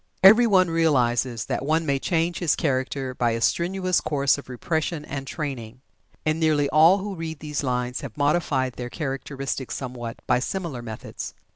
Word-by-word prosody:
Every 220 +5 +8
one 185 -4 +5
realizes 125 -8 +1
that - - -2
one 160 +3 +1
may 140 -2 +1
change 170 +2 0
his 170 -5 +2
character 130 -2 -1
by 120 -2 +1
a 115 - -2
strenuous 185 +7 +1
course 140 -1 +1
of 140 - -13
repression 160 +4 -2
and 135 -1 -5
training, 130 -7 -5 0.4
and 155 +1 +1
nearly 155 -3 +2
all 160 +6 +6
who 200 0 -4
read 165 -3 -5
these 150 0 -4
lines 125 -2 -2
have 130 -6 -8
modified 145 -3 +1
their 125 0 -6
characteristics 135 -2 -4
somewhat 120 -3 -6
by - - +3
similar 165 -3 -4
methods. 110 -2 -7
145 Hz, 165 wpm, -24 LUFS, 130-165 Hz, 0.4 s, Every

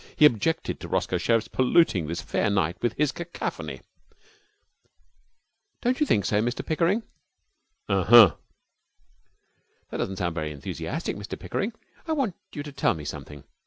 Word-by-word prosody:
He 150 - +6
objected 150 +4 +2
to - - -7
Roscoe - - 0
Sherriff's 115 -1 +1
polluting 125 - +3
this 85 +2 -4
fair - - 0
night 95 -4 +1
with 120 -2 0
his 150 +1 +1
cacophony. 170 +4 -5 2.0
'Don't 250 +1 +1
you 300 - +2
think 100 - +2
so, 105 +3 +2
Mr 120 +2 -2
Pickering?' 175 +8 +1 0.8
'Uh 95 -2 +1
huh.' 115 -6 +9 1.6
'That - - -3
doesn't 95 - -2
sound 85 -2 -1
very 80 -2 -3
enthusiastic. 70 -2 -4
Mr - - -6
Pickering, 215 +4 -3 0.3
I 320 - +1
want 270 - 0 0.2
you 145 - -5
to 145 - -8
tell 140 -8 +1
me 75 -2 -8
something. 75 -1 -8
115 Hz, 150 wpm, -26 LUFS, -, 2.0 s, huh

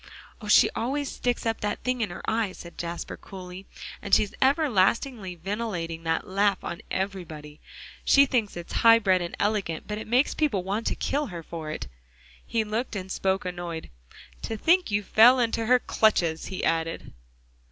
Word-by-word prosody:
"Oh! 210 - -8
she 210 - +7
always 275 +4 -2
sticks 245 -1 -2
up 225 0 -1
that 205 - -2
thing 250 -1 -1
in 215 - 0
her 175 - -8
eye," 220 -4 0
said 170 -1 -11
Jasper 170 0 -5
coolly, 185 0 -10 0.3
"and 200 -1 +4
she's 205 - +1
everlastingly 245 - +2
ventilating 175 -3 -4
that 165 0 0
laugh 195 0 +1
on 170 - -5
everybody. 160 -6 -5 0.4
She 280 0 +6
thinks 230 -8 -1
it 175 - -8
high 230 -1 +7
bred 190 -5 +2
and 170 - -4
elegant, 200 -6 -1
but 210 0 -4
it - - -8
makes 250 +5 +2
people 265 - 0
want 200 +4 -2
to - - 0
kill 290 +1 -1
her 170 -5 -7
for 160 -1 -7
it." 155 - -4 0.6
He 225 -1 0
looked 220 +3 -3
and 190 -1 -5
spoke 190 0 0
annoyed. 175 -2 -5 0.5
"To 225 - -4
think 350 - +3
you 205 0 0
fell 235 +6 +6
into 230 -1 0
her 250 +1 +6
clutches!" 175 -9 +1
he 190 - -5
added. 165 0 -1
205 Hz, 175 wpm, -26 LUFS, 175-230 Hz, 0.6 s, she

